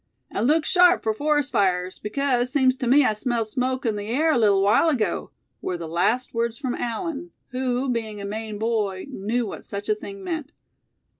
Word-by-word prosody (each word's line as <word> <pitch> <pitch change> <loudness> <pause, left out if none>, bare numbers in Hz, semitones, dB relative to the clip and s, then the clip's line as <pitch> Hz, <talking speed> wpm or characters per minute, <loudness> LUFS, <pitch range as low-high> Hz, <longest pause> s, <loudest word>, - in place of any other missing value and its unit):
"And 220 +4 0
look 310 +2 +3
sharp 360 0 +5
for 220 - +1
forest 295 +3 0
fires, 185 -4 +1
because, 250 +2 0
seems 260 -2 +3
to 250 - -2
me 275 +3 +6
I 215 - +3
smelled 230 0 -2
smoke 255 +3 -1
in 220 -2 0
the 205 0 -5
air 300 +8 +2
a 300 - +3
little 200 -3 +4
while 210 +11 +4
ago!" 220 - -1 0.3
were 180 - -2
the 170 -1 -6
last 190 +10 0
words 230 0 -1
from 255 -2 -2
Allan, 310 +7 -3 0.2
who, 255 0 -1
being 225 -4 -2
a 200 - -5
Maine 215 +1 -5
boy, 210 -4 -1
knew 230 +2 -1
what 205 - -7
such 200 +1 -6
a - - +5
thing 200 -2 -8
meant. 315 - -4
235 Hz, 200 wpm, -24 LUFS, 210-265 Hz, 0.3 s, me